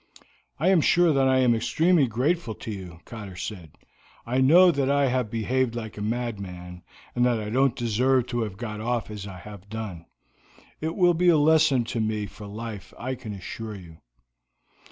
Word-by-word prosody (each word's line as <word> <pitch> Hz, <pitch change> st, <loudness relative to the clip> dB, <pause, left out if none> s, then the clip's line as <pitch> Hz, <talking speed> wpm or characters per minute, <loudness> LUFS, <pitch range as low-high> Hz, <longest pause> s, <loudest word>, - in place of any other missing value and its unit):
"I 170 Hz, +5 st, +3 dB
am 185 Hz, -4 st, +5 dB
sure 175 Hz, +1 st, +4 dB
that 135 Hz, -1 st, +3 dB
I 130 Hz, 0 st, +3 dB
am 125 Hz, -2 st, +4 dB
extremely 160 Hz, +6 st, +2 dB
grateful 125 Hz, +2 st, -1 dB
to 110 Hz, -, -7 dB
you," 90 Hz, -4 st, -8 dB
Cotter 105 Hz, -5 st, -9 dB
said. 90 Hz, -4 st, -7 dB, 0.5 s
"I 125 Hz, +3 st, 0 dB
know 175 Hz, +7 st, +7 dB
that 140 Hz, -3 st, 0 dB
I 140 Hz, -1 st, +3 dB
have 125 Hz, -3 st, 0 dB
behaved 120 Hz, +2 st, 0 dB
like 110 Hz, -3 st, -6 dB
a 105 Hz, -, -7 dB
madman, 100 Hz, -6 st, -4 dB, 0.3 s
and 120 Hz, -, +1 dB
that 120 Hz, -2 st, +2 dB
I 105 Hz, 0 st, -5 dB
don't 135 Hz, +1 st, +2 dB
deserve 125 Hz, +2 st, +1 dB
to 120 Hz, -1 st, -1 dB
have 105 Hz, -4 st, -4 dB
got 110 Hz, -2 st, -5 dB
off 120 Hz, -1 st, -2 dB
as 105 Hz, -1 st, -7 dB
I 95 Hz, -2 st, -8 dB
have 100 Hz, +1 st, -12 dB
done. 105 Hz, -6 st, -6 dB, 0.7 s
It 160 Hz, +1 st, -3 dB
will 175 Hz, -2 st, +4 dB
be 175 Hz, +2 st, +3 dB
a 165 Hz, -, +5 dB
lesson 150 Hz, -4 st, +4 dB
to 115 Hz, 0 st, -4 dB
me 110 Hz, -1 st, -1 dB
for 105 Hz, +1 st, -10 dB
life, 110 Hz, 0 st, -8 dB
I 130 Hz, +2 st, -3 dB
can 125 Hz, -4 st, -7 dB
assure 105 Hz, +3 st, -7 dB
you." 85 Hz, -4 st, -12 dB
115 Hz, 190 wpm, -25 LUFS, 105-135 Hz, 0.7 s, know